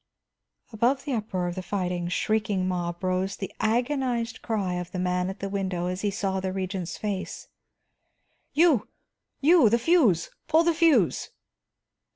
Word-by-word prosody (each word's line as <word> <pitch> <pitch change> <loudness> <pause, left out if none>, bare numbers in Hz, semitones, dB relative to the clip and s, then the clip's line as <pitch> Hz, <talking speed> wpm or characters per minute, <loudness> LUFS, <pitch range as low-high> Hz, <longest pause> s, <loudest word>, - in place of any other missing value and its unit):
Above 250 +5 +1
the 280 - -2
uproar 200 -6 -2
of 175 - -3
the 185 - -5
fighting, 180 -2 -2
shrieking 205 0 0
mob 175 -1 -3
rose 185 +1 0
the 195 - -6
agonized 240 0 0
cry 205 -5 -1
of 180 -1 -4
the - - -5
man 180 0 0
at 195 - -7
the 200 - -2
window 190 -3 -2
as 180 +1 -3
he 205 - +1
saw 195 -1 -1
the 190 0 -2
Regent's 185 -2 -4
face: 200 -3 -4 1.0
"You! 305 -8 +3 0.5
You! 310 -5 +6
The 235 - +3
fuse, 235 - +3 0.2
pull 320 +1 +4
the 340 0 +3
fuse!" 310 - +3
195 Hz, 155 wpm, -26 LUFS, 185-240 Hz, 1.0 s, You